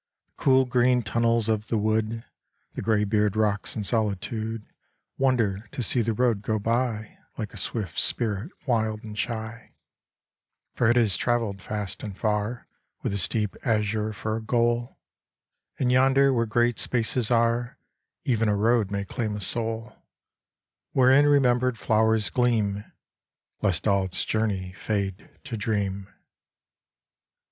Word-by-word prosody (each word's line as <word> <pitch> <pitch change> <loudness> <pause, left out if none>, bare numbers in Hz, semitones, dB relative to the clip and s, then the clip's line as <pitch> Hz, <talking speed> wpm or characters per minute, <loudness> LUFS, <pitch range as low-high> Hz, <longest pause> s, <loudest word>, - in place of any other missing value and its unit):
The - - -17
cool 130 -1 +5
green 125 0 +2
tunnels 115 +1 +1
of 110 -1 0
the 115 - 0
wood, 110 +2 0 0.5
The - - -5
graybeard 105 -1 +1
rocks 105 -2 0
in 105 - -2
solitude 110 +1 -2 0.5
Wonder 115 -6 +1
to 125 - -3
see 120 +2 +1
the 115 0 0
road 120 -3 +1
go 110 +1 -1
by 115 0 -2 0.2
Like 110 -1 -5
a - - -9
swift 95 -3 -3
spirit 110 - -1
wild 110 -4 0
and 105 -1 -8
shy; 110 0 -5 1.0
For 120 - +2
it 120 - +4
has 115 -6 +3
traveled 115 -5 -1
fast 105 -1 -4
and 100 -3 -7
far 105 +2 -1 0.4
With - - -1
the 100 - -2
steep 105 0 0
azure 110 -1 0
for 110 +1 -3
a - - -5
goal: 120 +1 0 0.8
And 125 -1 +1
yonder 135 +2 +4
where 115 -2 +1
great 120 +1 +1
spaces 120 -1 0
are 115 0 +1 0.5
Even 115 -4 +1
a 105 - +2
road 110 0 +2
may 100 0 -3
claim 110 0 -3
a - - -4
soul 115 +3 0 1.0
Wherein 135 +2 +5
remembered 125 -3 +3
flowers 110 -4 +2
gleam, 105 -3 +1 0.8
Lest 90 -4 0
all 100 -2 +3
its 95 - -2
journey 100 -4 -1
fade 100 0 -3
to 140 -5 -5
dream. 100 -2 -2
110 Hz, 140 wpm, -26 LUFS, 105-120 Hz, 1.0 s, cool